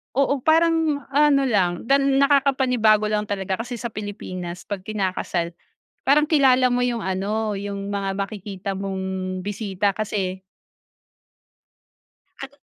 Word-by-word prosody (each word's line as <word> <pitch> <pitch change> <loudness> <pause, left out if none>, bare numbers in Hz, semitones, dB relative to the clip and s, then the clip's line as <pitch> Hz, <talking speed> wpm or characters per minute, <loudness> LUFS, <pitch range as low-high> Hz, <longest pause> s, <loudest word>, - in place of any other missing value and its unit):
Oo 275 -1 +1
parang 320 -4 +2
ano 285 -2 +4
lang 185 -5 0
dan 275 +1 +3
nakakapanibago 260 -6 +3
lang 210 0 0
talaga 195 +1 -2
kasi 240 0 -6
sa 235 - -4
Pilipinas 185 -4 -6
pag 200 -2 -4
kinakasal 185 -4 -2 0.5
parang 295 +2 +4
kilala 265 -5 +4
mo 245 0 +1
yung 245 -1 0
ano 205 +2 -2
yung 200 0 -5
mga 195 -1 -2
makikita 200 -1 -5
mong 190 -1 -4
bisita 200 -1 -1
kasi 195 -3 -3 2.0
Kat 270 - -7
210 Hz, 120 wpm, -23 LUFS, 195-265 Hz, 2.0 s, ano